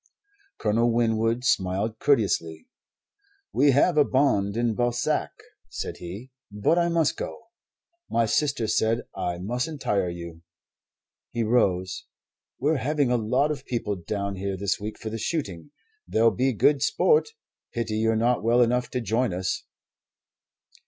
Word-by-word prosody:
Colonel 115 +3 +2
Winwood 115 0 +1
smiled 100 0 0
courteously. 85 - +1 0.9
"We 145 - +4
have 150 +4 +4
a - - +7
bond 120 -8 +1
in 120 -1 +1
Balzac," 120 +1 0 0.4
said - - -5
he. 100 +9 -8 0.2
"But 105 +12 +2
I 170 0 +2
must 165 -3 +2
go. - - -6 0.7
My 115 - +2
sister 140 +1 0
said 110 +2 +1
I 90 0 -2
mustn't 125 - -3
tire 100 -3 0
you." 85 -1 -8 0.9
He 120 - 0
rose. 95 -5 +1 0.5
"We're 150 +4 +1
having 145 -1 0
a - - +3
lot 125 +6 +1
of 140 -3 -5
people 115 -4 -2
down 100 +2 -4
here 95 0 -3
this 100 0 -1
week 105 +1 -6
for 110 - -6
the 115 - -4
shooting. 110 - -3 0.4
There'll 115 +1 +3
be 130 +7 +1
good 135 +5 +3
sport. 455 - +3 0.4
Pity 115 -2 -2
you're 110 +1 +2
not 120 +2 +1
well 120 +2 +4
enough 125 +1 0
to 125 - -2
join 115 -2 0
us." 90 0 -2
115 Hz, 145 wpm, -25 LUFS, 100-130 Hz, 0.9 s, a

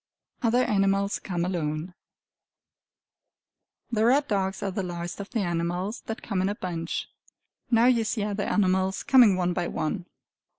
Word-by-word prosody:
Other 245 +1 +3
Animals 195 -1 +1
Come 175 -3 -2
Alone 165 -1 -2 2.0
The 220 -2 +1
red 275 +5 +4
dogs 195 -2 -1
are 195 - -1
the 195 - -2
last 175 -1 -5
of 200 - -6
the 230 - -1
animals 175 +4 -2
that 225 - -5
come 195 -4 -1
in 190 - +1
a 205 - -2
bunch. 170 -4 -4 0.6
Now 230 0 +4
you 245 -2 +4
see 215 -1 -1
other 205 0 -2
animals 190 -1 +1
coming 250 -8 +6
one 180 -1 0
by 175 0 -1
one. 175 +3 -3
195 Hz, 155 wpm, -26 LUFS, 180-220 Hz, 2.0 s, coming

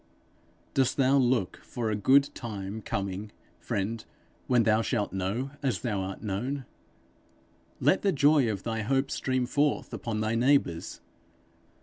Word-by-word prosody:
Dost 130 -2 +2
thou 135 0 +4
look 125 -7 +1
for 115 -3 -4
a - - 0
good 135 +7 +4
time 105 -2 -6
coming, 100 +1 -4 0.3
friend, 110 +3 -3 0.4
when 125 -2 +4
thou 110 0 +3
shalt 105 -3 -1
know 100 +8 -2
as 125 -10 -1
thou 105 -5 -1
art 95 +3 -6
known? 125 +7 -3 1.1
Let 190 - +3
the 200 - +2
joy 145 -4 +4
of 100 -3 -3
thy 115 -1 -2
hope 135 +4 0
stream 130 -1 0
forth 145 +4 0
upon 115 -2 -3
thy 110 +1 0
neighbours. 120 -8 +1
115 Hz, 140 wpm, -28 LUFS, 105-135 Hz, 1.1 s, thou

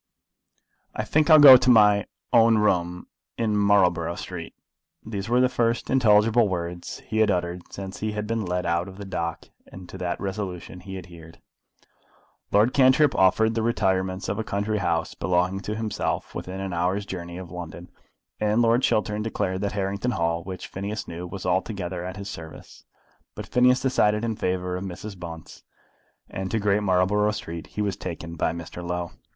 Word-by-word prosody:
"I 110 - -2
think 150 +7 +1
I'll 155 - +9
go 140 -4 +11
to 130 0 +1
my 105 -4 +5 0.3
own 115 -1 +6
room 90 -4 0 0.3
in 110 -2 0
Marlborough 90 -5 +3
Street." 90 -2 -7 0.5
These 100 -1 -5
were 120 +1 +3
the 130 - +5
first 120 -2 -1
intelligible 115 -2 +4
words 85 -1 -5
he 110 - -2
had 110 - +4
uttered 90 -1 -1
since 95 -1 -7
he 110 0 -2
had 105 0 -3
been 115 0 -2
led 90 -1 -2
out 85 +1 0
of 95 0 -11
the 100 - -7
dock, 85 -3 -4 0.2
and 95 -1 -11
to 95 - -9
that 90 -1 -3
resolution 95 -3 -5
he 95 +1 -8
adhered. 85 -3 -12 1.1
Lord 110 +5 +4
Cantrip 135 +2 +5
offered 110 +4 +3
the 115 - -1
retirements 95 -4 0
of 100 +3 -2
a - - -1
country 105 -1 -2
house 85 -3 -1
belonging 90 +1 0
to 105 +2 -4
himself 110 -2 -3
within 95 +1 -6
an 95 -1 -4
hour's 90 +4 0
journey 85 -2 -6
of 90 -2 -9
London, 90 0 -8 0.5
and 105 +1 +1
Lord 115 +2 +3
Chiltern 105 -3 +1
declared 95 -4 -2
that 100 - -2
Harrington 100 +3 -2
Hall, 85 0 0
which 95 -1 -7
Phineas 100 +3 -5
knew, 85 +1 -6
was 95 +1 -7
altogether 90 -1 -2
at 95 +1 -6
his 100 0 -7
service, 80 -5 -10 0.5
but - - -6
Phineas 125 +1 +3
decided 105 -4 +2
in 115 -1 -2
favour 90 -1 -2
of 90 - -5
Mrs. 100 +2 -7
Bunce, 80 -2 -9 0.7
and 95 0 -5
to 115 - 0
Great 105 -1 +1
Marlborough 100 +2 +2
Street 85 -5 -6
he 105 - -3
was 100 -3 -1
taken 85 0 -6
by 80 - 0
Mr. 85 +1 -8
Low. 85 0 -3
95 Hz, 180 wpm, -25 LUFS, 90-110 Hz, 1.1 s, go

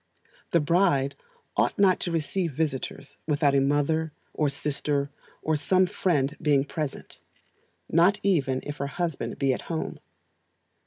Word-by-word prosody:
The 170 - +3
bride 150 -4 +2 0.4
ought - - +1
not 195 -2 +4
to 175 - -1
receive 165 +1 -1
visitors 145 -1 -3
without 145 -2 +3
a 140 - +4
mother, 145 +3 +1 0.2
or 150 -2 +1
sister, 140 0 -1 0.3
or 155 - +1
some 185 +5 +3
friend 150 -6 0
being 145 -2 +3
present, 150 -1 -5 0.7
not 175 +5 +4
even 140 -9 +2
if 145 0 -6
her 140 - -2
husband 165 +1 -3
be 135 -2 +2
at - - -4
home. 160 -2 -3
150 Hz, 140 wpm, -27 LUFS, 140-170 Hz, 0.7 s, not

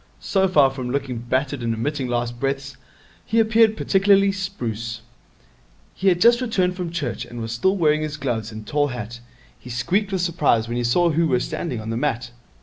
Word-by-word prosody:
So 190 -1 +1
far 145 -7 +4
from 130 -2 -5
looking 130 -2 -2
battered 130 +3 -1
and 115 -1 -1
emitting 135 +3 -2
last 120 0 -2
breaths, 135 0 -2 0.5
he 230 - +1
appeared 220 0 +4
particularly 195 0 +4
spruce. 120 - -4 0.9
He 195 - -2
had 175 -2 +4
just 235 +5 +5
returned 185 -7 0
from 180 -2 -4
Church, 135 - -3
and 120 0 -9
was 115 0 -4
still 190 - +1
wearing 155 -3 +3
his 155 -1 -4
gloves 115 -6 -3
and 110 0 -8
tall 145 +3 +1
hat. 120 -3 -6 0.4
He 125 - -12
squeaked 180 - 0
with 190 -2 0
surprise 150 -10 +1
when 120 +1 -3
he 120 - -1
saw 170 +9 +3
who 165 +2 +2
were 125 -4 +2
standing 130 -2 -3
on 110 +1 -5
the 115 - -2
mat. 120 -3 -2
140 Hz, 195 wpm, -22 LUFS, 120-180 Hz, 0.9 s, just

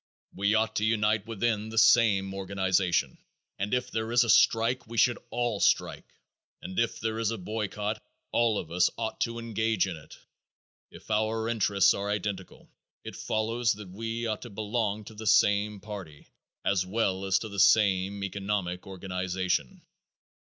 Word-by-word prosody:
We 100 +3 +1
ought 110 0 +1
to 105 - 0
unite 105 -1 +1
within 110 -1 -1
the 115 - -7
same 110 -4 +4
organization, 95 -2 0 0.4
and 100 +1 -2
if 125 0 -1
there 110 0 -2
is 120 +1 +5
a 115 - +3
strike 115 +2 +3
we 115 +1 -8
should 120 +3 +3
all 120 -4 -1
strike, - - +1 0.5
and 95 - -4
if 115 -1 0
there 110 0 -2
is 115 -2 +1
a 115 - -3
boycott 105 +2 -3 0.3
all 115 -3 +2
of 85 - -5
us 90 +1 +3
ought 110 -1 -4
to 115 -1 -1
engage 110 -3 0
in 95 -3 -4
it. 80 - -14 0.7
If - - -12
our 110 +1 0
interests 100 -4 +3
are 100 +1 -3
identical, 100 -2 -4 0.4
it - - -8
follows 115 +2 0
that 105 -2 -10
we 115 +4 -4
ought 110 -2 -2
to 120 - -8
belong 105 0 -2
to 110 - -11
the 110 +1 -7
same 105 0 +3
party 95 -7 -9 0.4
as 95 -2 +2
well 95 -1 -1
as 95 0 +3
to 110 +2 -5
the 100 -1 -5
same 100 -1 +3
economic 95 -2 -3
organization. 95 -5 -3
105 Hz, 165 wpm, -28 LUFS, 95-115 Hz, 0.7 s, is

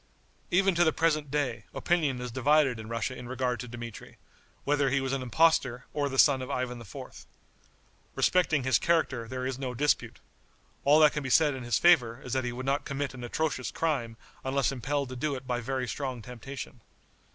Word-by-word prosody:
Even 190 +2 +3
to 170 0 +4
the 160 - +4
present 155 -3 +1
day 130 -7 -2
opinion 155 -7 +1
is 125 -1 -5
divided 135 -1 +3
in 110 0 -8
Russia 115 +2 -2
in 125 - -8
regard 125 -2 -1
to 125 - -6
Dmitri, 120 -2 -9 0.5
whether 145 -1 +2
he 135 +1 +2
was 135 0 -2
an 135 - -1
impostor 130 -2 +2
or 145 -1 0
the 135 - -4
son 135 -1 +5
of 130 - -6
Ivan 125 -3 -3
IV. 105 - -10 0.9
Respecting 160 -6 +2
his 130 -1 +3
character 140 -8 +1
there 130 +1 -4
is 130 0 -3
no 130 -2 -4
dispute. 145 +4 0 0.7
All 145 +2 +6
that 150 -1 +6
can 150 - -2
be 135 - -4
said 150 +2 +4
in 130 - -6
his 120 -1 0
favor 130 -9 +4
is 125 - -5
that 130 -1 0
he 120 - -2
would 125 +2 -6
not 140 +2 0
commit 140 -1 -3
an 125 -2 -9
atrocious 130 +1 -2
crime 125 -9 -2 0.3
unless 135 0 +1
impelled 135 -1 -3
to 150 -2 0
it 130 0 -8
by 125 -1 -2
very 130 +1 -2
strong 130 -3 -4
temptation. 125 +1 -8
130 Hz, 195 wpm, -29 LUFS, 125-145 Hz, 0.9 s, All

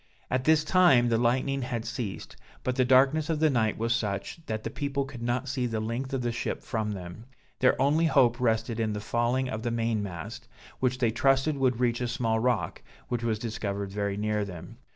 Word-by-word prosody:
At 130 0 0
this 155 -1 +4
time 155 -9 +5
the 115 -1 +2
lightning 130 +3 +1
had 120 -2 -3
ceased, 120 -5 -5 0.3
but 125 - -1
the 130 - +3
darkness 135 +5 +4
of 160 -2 0
the 155 -1 +4
night 110 -4 +1
was 115 +1 +1
such, 110 +8 -3
that 110 0 -3
the - - -4
people 140 -1 -2
could 135 -3 -9
not 120 +3 -1
see 130 -2 -1
the 115 -2 -2
length 115 +5 -3
of 135 -2 -2
the 120 - 0
ship 115 - -3
from 110 -2 -2
them; 90 +3 -8 0.3
their 125 - +3
only 150 +5 +3
hope 120 -5 +3
rested 115 -1 0
in 110 -1 0
the 105 - -3
falling 120 +4 0
of 110 -4 -4
the 120 - -1
main 115 -2 0
mast, 105 +6 -7 0.3
which 130 0 +1
they 120 -3 +2
trusted 135 +5 +2
would 130 -3 +1
reach 120 -1 +1
a 125 - 0
small 115 -2 0
rock, 110 -9 0 0.3
which 120 -2 -1
was 115 -2 0
discovered 100 -3 -4
very 100 0 -2
near 105 0 0
them. 100 +4 -9
120 Hz, 215 wpm, -28 LUFS, 110-130 Hz, 0.3 s, time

